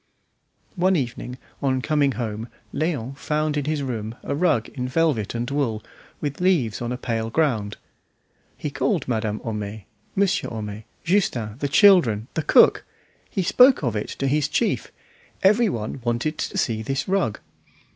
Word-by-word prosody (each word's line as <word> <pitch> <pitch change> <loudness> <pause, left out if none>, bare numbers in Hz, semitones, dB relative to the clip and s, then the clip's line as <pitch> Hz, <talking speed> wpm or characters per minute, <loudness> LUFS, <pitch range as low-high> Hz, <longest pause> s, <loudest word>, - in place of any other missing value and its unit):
One 185 +1 +3
evening 125 -3 -3 0.2
on 130 -2 +1
coming 145 -3 +2
home 110 -2 -4 0.3
Léon 140 -5 -2
found 150 +1 -1
in 145 -2 -1
his 150 -1 -1
room 115 -3 -4
a - - -2
rug 150 -7 +2
in 125 -2 -4
velvet 130 -7 0
and 120 +1 -2
wool 120 -7 -1 0.4
with 145 +2 -4
leaves 160 - +2
on 120 0 -2
a 125 - -2
pale 115 -2 -2
ground. 115 -8 0 0.8
He - - -4
called - - 0
Madame 110 -3 -1
Homais, 105 -2 -5 0.3
Monsieur 195 0 +1
Homais, 105 -1 -6 0.2
Justin, 125 - 0
the 145 - 0
children, 140 - +5
the 160 - 0
cook; - - +5 0.5
he 195 - -1
spoke 250 - +5
of 120 -4 0
it 105 - -3
to 135 - -2
his 145 +2 +2
chief; 220 +9 0 0.5
every 210 +4 +5
one 115 - -4
wanted 120 +6 -1
to - - -3
see 110 -2 0
this 135 +5 -2
rug. 190 - 0
130 Hz, 155 wpm, -23 LUFS, 110-155 Hz, 0.8 s, children